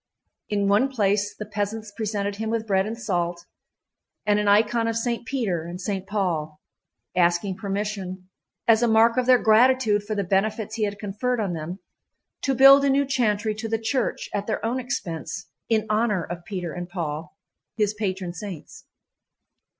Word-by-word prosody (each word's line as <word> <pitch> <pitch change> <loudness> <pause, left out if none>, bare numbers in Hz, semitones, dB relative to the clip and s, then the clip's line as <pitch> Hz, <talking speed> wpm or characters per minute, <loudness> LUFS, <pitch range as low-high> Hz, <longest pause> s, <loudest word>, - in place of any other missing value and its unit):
In 205 -1 +1
one 210 +7 +3
place 205 -4 +1
the 210 - -5
peasants 210 +1 -4
presented 205 -2 -2
him 220 +1 -3
with 225 -1 -1
bread 195 -1 +1
and 225 +1 -4
salt 175 -5 -2 0.8
and 210 0 +3
an 210 - 0
icon 225 +3 +3
of 230 0 0
Saint 235 0 -2
Peter 210 -12 -1
and 175 +2 -7
Saint 195 0 -3
Paul, 165 -7 -2 0.6
asking 175 +2 +2
permission, 195 -2 -4 0.4
as 225 -1 +5
a 240 - +3
mark 225 +1 +5
of 255 -1 +1
their 255 -1 +7
gratitude 225 -1 +4
for 210 +1 -4
the 200 - 0
benefits 210 +3 0
he 220 -1 0
had 205 0 -4
conferred 215 +5 -2
on 200 -5 -1
them, 165 +3 -5 0.6
to 270 -1 0
build 275 +2 +8
a 280 - +3
new 280 +1 +3
chantry 220 -5 +1
to 220 +1 -5
the 225 - +1
church 225 +4 -1
at 205 0 -2
their 220 - -2
own 240 +3 0
expense 170 - -5 0.2
in 220 -2 +2
honor 215 -4 +1
of 175 +1 -7
Peter 175 -4 -4
and 175 0 -6
Paul, 160 -1 -5 0.4
his 210 -1 +1
patron 190 -4 -3
saints. 180 -2 -9
210 Hz, 175 wpm, -24 LUFS, 190-225 Hz, 0.8 s, build